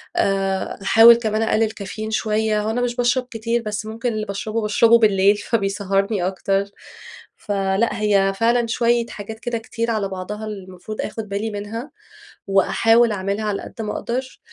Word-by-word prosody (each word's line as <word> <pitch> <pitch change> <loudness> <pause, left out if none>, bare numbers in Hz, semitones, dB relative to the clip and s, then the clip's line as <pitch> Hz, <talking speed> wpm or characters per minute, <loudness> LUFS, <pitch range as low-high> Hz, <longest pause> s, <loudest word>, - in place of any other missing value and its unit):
آآ، 195 -1 0
باحاول 225 +4 +7
كمان 220 -2 -1
أقلل 220 0 +1
كافيين 215 +2 -6
شوية، 215 -1 0
هو 215 - -2
أنا 235 +2 -1
مش 240 -1 -1
باشرب 245 +1 +1
كتير، 230 +1 -1
بس 215 -1 -4
ممكن 230 +2 -3
اللي 215 0 -3
باشربه 215 +3 -3
باشربه 230 +2 +4
بالليل 200 -2 +4
فبيسهّرني 195 -2 -1
أكتر، 195 +1 0 0.7
فلأ 200 +2 -1
هي 195 -2 +3
فعلًا 235 +1 +2
شوية 235 0 +1
حاجات 220 +2 -8
كده 240 0 -3
كتير 230 +1 -3
على 215 -3 -1
بعضها 205 +3 -6
المفروض 195 0 -7
آخُد 215 -1 -5
بالي 205 +3 -2
منها، 215 +6 -6 0.6
وأحاول 225 +4 +3
أعملها 200 +2 -2
على 205 -1 -2
قدّ - - -8
ما 210 - -3
أقدر. 255 +2 -4
215 Hz, 155 wpm, -21 LUFS, 200-230 Hz, 0.7 s, باحاول